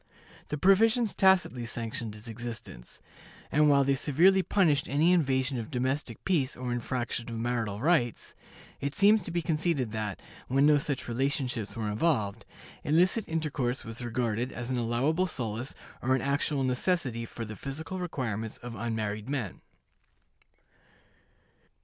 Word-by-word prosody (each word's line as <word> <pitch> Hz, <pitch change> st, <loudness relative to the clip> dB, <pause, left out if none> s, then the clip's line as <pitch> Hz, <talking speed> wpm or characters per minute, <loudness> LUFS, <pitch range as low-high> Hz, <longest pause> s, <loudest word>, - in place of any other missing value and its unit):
The 150 Hz, -, -2 dB
provisions 220 Hz, -, +4 dB
tacitly 190 Hz, -10 st, +3 dB
sanctioned 115 Hz, -2 st, -4 dB
its 105 Hz, +2 st, -12 dB
existence; 115 Hz, -, -8 dB, 0.5 s
and 150 Hz, 0 st, +4 dB
while 140 Hz, -1 st, +5 dB
they 140 Hz, 0 st, +2 dB
severely 165 Hz, +8 st, +4 dB
punished 170 Hz, -7 st, +2 dB
any 155 Hz, +5 st, +3 dB
invasion 135 Hz, -6 st, +2 dB
of 115 Hz, -, -6 dB
domestic 130 Hz, -2 st, -2 dB
peace 150 Hz, -9 st, +1 dB
or 125 Hz, -1 st, -3 dB
infraction 120 Hz, 0 st, -3 dB
of 115 Hz, -, -5 dB
marital 115 Hz, -3 st, -2 dB
rights, 140 Hz, -, +1 dB, 0.5 s
it 140 Hz, +1 st, -3 dB
seems 210 Hz, +2 st, +5 dB
to 175 Hz, -, -5 dB
be 170 Hz, 0 st, -1 dB
conceded 155 Hz, -7 st, 0 dB
that, 105 Hz, -3 st, -3 dB, 0.3 s
when 135 Hz, +2 st, +3 dB
no 150 Hz, -1 st, +6 dB
such 140 Hz, -1 st, -3 dB
relationships 125 Hz, -3 st, -1 dB
were 110 Hz, -2 st, -2 dB
involved, 110 Hz, -4 st, 0 dB, 0.4 s
illicit 180 Hz, +8 st, +3 dB
intercourse 150 Hz, -6 st, -2 dB
was 115 Hz, +2 st, -5 dB
regarded 120 Hz, 0 st, -1 dB
as 120 Hz, +1 st, -5 dB
an 125 Hz, -, 0 dB
allowable 135 Hz, +10 st, +1 dB
solace 120 Hz, -4 st, -3 dB, 0.3 s
or 130 Hz, +2 st, +2 dB
an 130 Hz, -, -1 dB
actual 140 Hz, 0 st, 0 dB
necessity 130 Hz, -2 st, 0 dB
for 115 Hz, 0 st, -6 dB
the 110 Hz, 0 st, -7 dB
physical 155 Hz, -, -5 dB
requirements 115 Hz, -, -3 dB
of 120 Hz, 0 st, -8 dB
unmarried 110 Hz, -1 st, -3 dB
men. 130 Hz, -10 st, -3 dB
130 Hz, 145 wpm, -29 LUFS, 115-155 Hz, 0.5 s, no